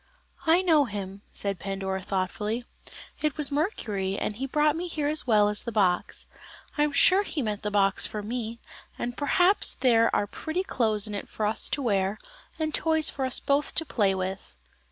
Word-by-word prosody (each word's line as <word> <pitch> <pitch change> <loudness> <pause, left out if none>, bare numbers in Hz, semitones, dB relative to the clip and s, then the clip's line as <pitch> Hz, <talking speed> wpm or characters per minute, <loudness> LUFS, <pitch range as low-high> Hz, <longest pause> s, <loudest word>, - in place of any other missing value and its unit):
"I 340 +3 +5
know 315 -5 +4
him," 200 -3 -6
said 200 -3 0
Pandora 195 -1 -3
thoughtfully. 210 +5 -3 0.6
"It 305 0 -1
was 300 -1 +3
Mercury, 210 - -2
and 210 - -3
he 265 +5 -4
brought 300 +2 +2
me 350 +2 -3
here 305 -4 -2
as 305 -2 +1
well 210 -3 +4
as 210 0 0
the 235 - -5
box. 190 -5 0 0.5
I 295 - 0
am 295 0 +2
sure 365 +7 +5
he 320 -8 -3
meant 210 -2 -3
the 210 - -2
box 195 -1 +2
for 210 -1 -6
me, 230 +1 -4 0.4
and 240 0 -4
perhaps 355 +8 +3
there 230 -3 +3
are - - +1
pretty 315 - -4
clothes 220 - +1
in 210 - -4
it 200 - -6
for 215 - -3
us 215 +1 0
to 275 +1 -2
wear, 200 -3 0 0.4
and 310 -1 -2
toys 320 -1 +2
for 270 - -3
us 260 - +2
both 280 +1 0
to 325 - 0
play 200 -8 +1
with." 190 +1 -5
230 Hz, 195 wpm, -26 LUFS, 200-295 Hz, 0.6 s, I